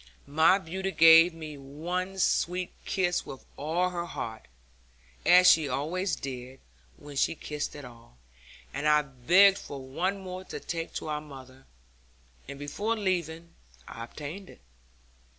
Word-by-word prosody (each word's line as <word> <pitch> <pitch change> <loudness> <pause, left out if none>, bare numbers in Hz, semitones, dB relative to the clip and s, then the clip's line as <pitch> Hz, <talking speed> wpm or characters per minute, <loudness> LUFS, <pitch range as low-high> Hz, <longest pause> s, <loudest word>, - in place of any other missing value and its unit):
My 160 +6 +4
beauty 190 +1 -4
gave 165 -1 +7
me 155 -3 -9
one 175 +7 -4
sweet 180 -1 0
kiss 180 -2 0
with 135 - -10
all 170 +5 -1
her 175 -1 -4
heart 110 -8 -6 0.8
(as 180 +1 +7
she 160 -5 +6
always 165 +7 -1
did, 130 0 -7 0.4
when 145 -1 -11
she 140 - +1
kissed 150 -1 -5
at 145 -2 -9
all), 115 - -15 0.6
and 150 - -2
I 150 0 +5
begged 175 +9 +4
for 140 - -8
one 170 +10 -2
more 185 -1 -7
to - - -7
take 165 -1 -5
to - - -4
our 150 0 -2
mother, 135 -3 -13 0.8
and 140 +1 -8
before 205 +11 -2
leaving, 170 -4 -2 0.3
I 115 - -8
obtained 155 +10 -8
it. - - -16
160 Hz, 145 wpm, -28 LUFS, 140-180 Hz, 0.8 s, gave